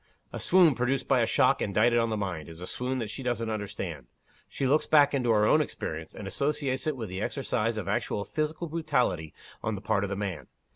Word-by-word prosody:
A - - -4
swoon 175 -4 +5
produced 125 +2 -1
by - - +4
a - - +2
shock - - +3
indicted 115 +4 +3
on 115 0 +1
the 110 - -1
mind, 90 -6 -4
is 80 0 -11
a 90 - -6
swoon 125 +6 -2
that 110 -4 -3
she 135 - -6
doesn't 115 -3 -1
understand. 100 - -5 0.4
She 135 - -2
looks 145 +4 +2
back 145 -2 +5
into 125 -4 +1
her 105 -2 +4
own 155 +8 +5
experience, 80 - -5
and 100 - -7
associates 140 +5 -1
it 150 -3 -1
with 115 -3 -4
the 95 +1 -5
exercise 115 -3 -1
of 100 -3 -4
actual 100 0 -1
physical 155 +2 -2
brutality 130 - 0 0.3
on 110 0 -1
the 95 - -7
part 100 - +1
of 100 - -2
the 100 - -2
man. 95 -9 -4
115 Hz, 225 wpm, -28 LUFS, 100-135 Hz, 0.4 s, swoon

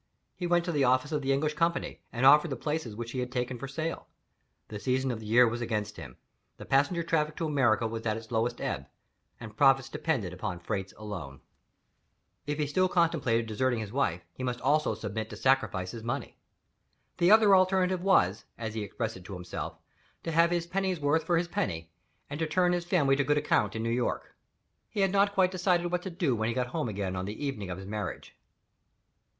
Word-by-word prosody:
He 175 - -3
went 175 0 +2
to 175 - -1
the 145 -4 +1
office 130 +3 +2
of 150 -1 0
the 135 0 0
English 150 +3 +1
company, 165 +2 -1
and 125 +1 0
offered 150 +4 +7
the 135 - -3
places 150 -4 -3
which 115 +1 -5
he 130 - -3
had 125 0 -3
taken 125 -1 -2
for 135 - -5
sale. 155 +4 -4 0.6
The 105 - -6
season 130 +3 0
of 115 - -4
the 110 - -9
year 120 +3 +6
was 120 +1 -2
against 105 -3 -2
him; 65 -2 -10 0.4
the - - -9
passenger 145 +6 +2
traffic 155 -2 0
to 165 - -2
America 130 -7 +2
was 115 0 -4
at 110 0 0
its 115 0 -10
lowest 120 +1 0
ebb, 70 0 -3 0.5
and 110 -2 -9
profits 135 +1 +4
depended 120 - -2
upon 90 0 -4
freights 95 +1 -3
alone. 90 -11 -7 1.1
If 145 0 -1
he 150 - 0
still 185 +6 +1
contemplated 160 -10 +2
deserting 120 +3 0
his 105 -2 -5
wife, 105 -10 0
he - - -10
must 125 -1 -2
also 145 -4 +2
submit 110 +1 -4
to - - -7
sacrifice 105 -9 +1
his 115 - -7
money. 120 +2 -4 0.8
The 175 - +4
other 210 -2 +7
alternative 185 -1 +3
was 110 - +3
(as 110 -2 -4
he 110 - -3
expressed 110 +1 -4
it 90 - -13
himself) 90 -3 -6 0.5
to 165 - -3
"have 165 +1 +4
his 175 -1 0
pennyworth 170 -5 0
for 170 0 +2
his 170 +1 0
penny, 80 - -3 0.4
and 145 +1 -6
to 165 - 0
turn 180 +3 +2
his 175 -1 -1
family 150 -7 +3
to 140 - +2
good 150 +2 +2
account 105 -8 +1
in 110 - -2
New 115 - 0
York." 120 0 -2 0.5
He 210 - -2
had 195 -1 +3
not 200 +1 +3
quite 185 -1 +4
decided 180 -2 +1
what 180 0 0
to 190 - -5
do 170 -8 0
when 110 0 -1
he 115 - -2
got 125 -1 +1
home 120 - -1
again 95 -2 -3
on 95 0 -3
the 105 +8 -5
evening 105 -9 -4
of 90 - -4
his 95 - -8
marriage. 105 -1 -5
130 Hz, 210 wpm, -29 LUFS, 110-165 Hz, 1.1 s, offered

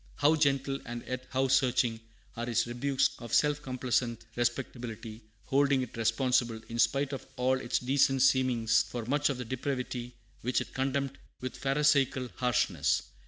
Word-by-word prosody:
How 150 +2 +4
gentle, 140 -2 +1
and 120 0 -6
yet 130 0 -4
how 135 0 +1
searching, 125 -3 +2 0.4
are 120 +1 -4
his 120 - +1
rebukes 130 +3 +1
of 120 - -2
self 150 -1 +3
complacent 125 -3 -1
respectability, 120 -2 -3 0.2
holding 140 -1 +3
it 125 - -9
responsible, 115 0 +1
in 115 0 -4
spite 140 +2 +2
of 135 - -6
all 130 +1 +1
its 120 -1 0
decent 135 0 +2
seemings, 130 -4 +3
for 120 -2 -5
much 145 +4 +1
of 140 - -2
the 125 - -5
depravity 125 -1 -4 0.3
which 125 +2 +1
it - - -6
condemned 135 0 -1 0.2
with 130 0 -5
Pharisaical 135 -1 +2
harshness! 125 -3 +1
130 Hz, 155 wpm, -30 LUFS, 120-135 Hz, 0.4 s, How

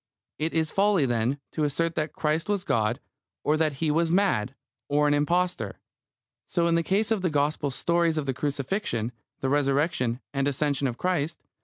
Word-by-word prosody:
It 160 +2 -1
is 160 -1 +1
folly, 195 -6 +3
then, 120 +3 0
to 155 - -1
assert 165 +3 0
that 155 -1 -2
Christ 155 +4 -1
was 200 -3 0
God, 115 -3 +1 0.4
or 150 - +3
that 155 -1 +1
He 150 +3 0
was 165 +2 +2
mad, 155 - +2 0.3
or 150 +1 +3
an 145 - +3
impostor. 175 +5 0 0.7
So 170 -2 +1
in 170 - +3
the 170 - +3
case 205 +6 0
of 220 -4 +2
the 180 - +1
Gospel 145 0 0
stories 170 +4 +1
of 150 - -1
the 135 - -1
Crucifixion, 135 - -2 0.3
the 135 - 0
Resurrection, 140 -3 +1
and 140 0 +1
Ascension 140 0 +1
of 120 -2 -4
Christ. 175 -4 -1
150 Hz, 180 wpm, -26 LUFS, 140-170 Hz, 0.7 s, folly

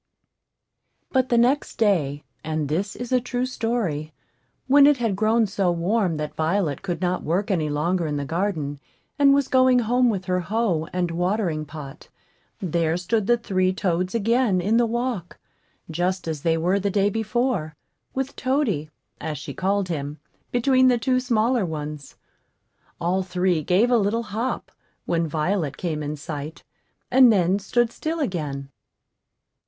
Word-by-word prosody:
But 260 -1 +2
the 240 - +3
next 255 +5 +2
day, 155 -10 +1 0.2
(and 155 -2 -2
this 190 +7 -1
is 245 0 -6
a 255 -1 +3
true 250 +1 -2
story,) 225 - -2 0.5
when 280 +1 +7
it 295 -1 +5
had 230 -5 0
grown 220 +3 +3
so 195 -3 0
warm 175 0 0
that 150 0 -4
Violet 160 -2 0
could 175 -4 -4
not 180 0 0
work 185 +6 -1
any 160 -5 0
longer 165 +4 0
in 150 -1 -2
the 140 - -3
garden, 160 -4 -2 0.4
and 280 -1 +6
was 280 -1 +3
going 255 -1 +4
home 245 +1 +3
with 190 -4 -2
her 180 0 0
hoe 180 -4 0
and 180 -1 -1
watering 175 -2 -1
pot, 150 -1 -10 0.5
there 170 -4 0
stood 200 +3 -1
the 240 0 +4
three 185 -5 +1
toads 185 0 -1
again 230 -2 +2
in 210 +6 +2
the 235 -1 +3
walk, 235 -6 -3 0.5
just 180 +3 -2
as 155 -3 -3
they 165 +1 +2
were 180 +5 +1
the 200 +1 0
day 200 +1 +2
before, 220 -6 -1 0.4
with 270 0 -2
Toady, 255 - 0 0.3
as 155 -2 -4
she - - -7
called 195 0 0
him, 145 -2 -4 0.3
between 260 +1 +4
the 250 -1 +4
two 255 +2 +1
smaller 240 -1 +1
ones. 150 -3 -6 0.8
All 175 +2 +1
three 180 -2 0
gave 190 - +2
a 245 - +5
little 215 +3 0
hop 230 +5 -3 0.3
when 165 -1 0
Violet 155 0 -1
came 160 -4 -3
in 150 0 -3
sight, 150 +1 -7 0.5
and 255 -1 +7
then 190 -1 +2
stood 235 +4 +1
still 320 +6 -3
again. 150 - -3
190 Hz, 160 wpm, -24 LUFS, 160-235 Hz, 0.8 s, when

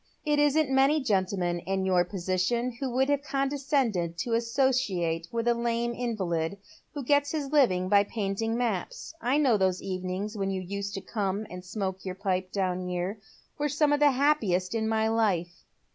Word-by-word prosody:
It 295 -1 +2
isn't 295 -1 +3
many 270 +3 +4
gentlemen 190 -7 0
in 190 +2 -2
your 180 -2 +3
position 185 +7 -1
who 270 - -2
would 260 +2 +1
have 285 -1 +2
condescended 270 - 0
to 235 - -2
associate 230 -9 +1
with 230 0 -2
a 240 - +5
lame 235 0 -1
invalid, 195 -8 -2 0.4
who 285 - -3
gets 285 +2 +2
his 290 -3 -3
living 185 -12 +3
by 200 +1 +4
painting 220 +2 -2
maps. 245 - -3
I 260 +1 +2
know 265 -7 +4
those 185 -2 +1
evenings 185 +3 -3
when 195 -2 -1
you 190 -1 -2
used 200 +2 -4
to 195 - -4
come 205 0 -2
and 180 0 -7
smoke 190 0 -4
your 185 -1 -4
pipe 185 -1 -2
down 185 -2 -1
here 180 +4 -3 0.4
were 295 0 +1
some 295 +1 +2
of 290 - +2
the 295 -1 +6
happiest 245 -10 +1
in 220 -1 0
my 220 0 +2
life." 195 -6 0
215 Hz, 175 wpm, -28 LUFS, 185-265 Hz, 0.4 s, the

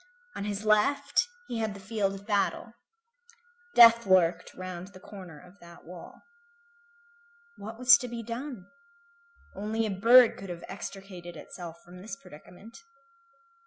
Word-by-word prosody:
On 200 - -4
his 205 +1 -4
left 280 - +2 0.2
he 235 - -4
had 220 -2 -2
the - - -10
field 195 0 -2
of 195 +1 -12
battle. 210 +2 -1 1.0
Death 230 -2 +8
lurked 175 -3 +2
round 185 -1 -7
the 195 -1 -15
corner 185 -6 -11
of 180 +4 -18
that 170 0 -15
wall. 175 +1 -12 1.3
What 220 +2 -9
was 250 0 +7
to 250 - -5
be 235 -1 -6
done? 235 -2 -6 0.9
Only 215 +3 -2
a 215 - -2
bird 230 +5 +6
could 195 - -9
have 175 -1 -7
extricated 190 -3 -9
itself 170 +1 -10
from 180 +1 -13
this 195 0 -7
predicament. 195 +5 -15
200 Hz, 140 wpm, -28 LUFS, 180-225 Hz, 1.3 s, Death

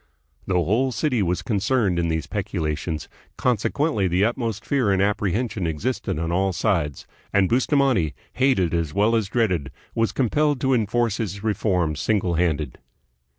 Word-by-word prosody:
The 95 - 0
whole 110 - +2
city 125 -3 0
was 90 0 0
concerned 105 -3 +1
in 85 - +1
these 80 -3 -1
peculations, 85 -6 -3 0.3
conse 120 -4 +1
quently 140 - +1
the 90 +4 +2
utmost 115 -2 -2
fear 130 -8 +1
and 95 - +2
apprehension 105 0 0
existed 80 +6 -2
on 80 +1 -2
all 95 +2 +1
sides; 85 - -1 0.3
and 100 -2 +3
Bustamante, 130 - +2 0.2
hated 125 -11 +2
as 80 -3 -1
well 105 +3 +3
as 110 -4 0
dreaded, 95 - 0 0.2
was 115 -1 +1
compelled 145 +3 +1
to 135 -1 +2
enforce 115 -1 +1
his 100 -2 -4
reforms 90 -7 0
single 95 -4 +1
handed. 80 -5 -1
100 Hz, 150 wpm, -23 LUFS, 85-120 Hz, 0.3 s, and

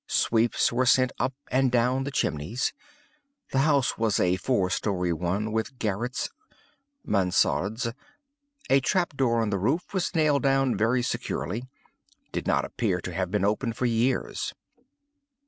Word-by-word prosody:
Sweeps 115 +1 +2
were 125 +1 +1
sent 130 0 +4
up 130 +1 0 0.2
and 130 0 +3
down 125 +2 +2
the - - -2
chimneys. 90 - -1 0.8
The 135 - +1
house 140 -4 +2
was 110 -2 +1
a 90 0 +3
four 95 -6 0
story 90 -4 0
one, 90 +6 -2
with 110 +4 -2
garrets 115 +4 -2 0.7
(mansardes.) 100 +4 +1 0.8
A 135 - +6
trap 170 +3 0
door 115 -4 +2
on 105 - -1
the 100 - 0
roof 140 - -1
was 185 -1 -1
nailed 150 -3 +3
down 135 -2 +2
very 120 +3 +1
securely—did 125 +1 -6
not - - +2
appear 95 -6 -1
to 90 0 -6
have 95 +2 -1
been 105 -2 0
opened 115 +3 -1
for 125 - 0
years. 120 +2 0
120 Hz, 145 wpm, -26 LUFS, 105-130 Hz, 0.8 s, A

